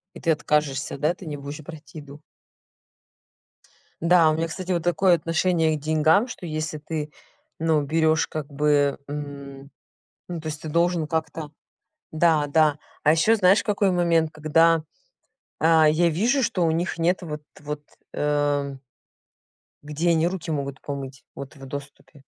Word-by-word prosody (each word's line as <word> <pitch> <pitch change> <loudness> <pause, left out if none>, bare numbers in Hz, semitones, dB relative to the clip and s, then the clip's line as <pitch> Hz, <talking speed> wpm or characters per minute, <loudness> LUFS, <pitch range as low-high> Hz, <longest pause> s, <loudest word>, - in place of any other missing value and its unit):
И - - -9
ты 165 - +1
откажешься, 150 -3 0
да? 155 +4 +1
Ты 185 - -12
не 150 -2 -5
будешь 145 +2 -8
брать 155 0 -12
еду? 145 0 -10 1.8
Да, 170 -1 +5
у 155 - +2
меня, 165 +1 -1
кстати, 185 +2 -5
вот 170 -2 0
такое 175 +1 +3
отношение 165 -1 +1
к - - -9
деньгам, 155 - +3
что 210 -7 -8
если 155 -1 -3
ты, 150 0 -5 0.5
ну, 160 -2 +2
берёшь 160 +1 +2
как 155 -2 -5
бы, 145 -1 +1
м, 140 -1 -7 0.6
ну, 175 -2 -5
то 155 - -7
есть 150 -1 -5
ты 155 - -6
должен 170 -1 +1
как-то 160 -1 -3 0.6
да, 155 -2 +3
да. 150 0 +3 0.2
А 150 - +4
ещё 190 +8 +4
знаешь 195 -1 +4
какой 200 -1 +1
момент, 170 -3 +2
когда, 160 +1 +3 0.8
а, 160 -1 +5
я 170 +3 +3
вижу, 235 - +1
что 185 -6 0
у 165 - +2
них 170 +1 -2
нет 175 +3 +2
вот 150 -3 -6 0.2
вот, 150 0 -6 0.3
эм 145 -2 0 1.0
где 155 +4 0
они 165 0 +2
руки 175 -2 -5
могут 140 -3 -3
помыть, 135 -2 -7
вот 140 +2 -9
в 135 - -11
доступе. 140 +1 -10
155 Hz, 155 wpm, -24 LUFS, 145-170 Hz, 1.8 s, Да